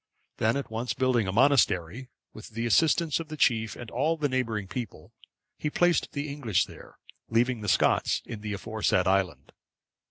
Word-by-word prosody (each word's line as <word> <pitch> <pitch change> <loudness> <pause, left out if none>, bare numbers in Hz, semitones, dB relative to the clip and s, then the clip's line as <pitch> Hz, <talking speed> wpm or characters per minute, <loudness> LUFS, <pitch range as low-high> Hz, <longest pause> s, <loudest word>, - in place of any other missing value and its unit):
Then 110 +4 +1
at 140 -5 -5
once 115 +3 -3
building 125 -5 +1
a - - -1
monastery, 120 - +2 0.2
with 110 - -10
the 115 +1 -4
assistance 160 +5 +3
of 165 - -6
the 155 0 -7
chief 110 -5 +2
and 120 -2 -9
all 155 +7 0
the 150 -2 0
neighbouring 115 -6 -2
people, 110 +2 -7 0.5
he 150 - -1
placed 175 +3 +1
the 145 0 -3
English 135 -9 0
there, - - -14 0.3
leaving 120 0 +1
the 105 - -2
Scots - - +2
in 110 -3 -7
the 105 -1 -4
aforesaid 105 -2 0
island. 95 -2 0
120 Hz, 170 wpm, -27 LUFS, 105-140 Hz, 0.5 s, assistance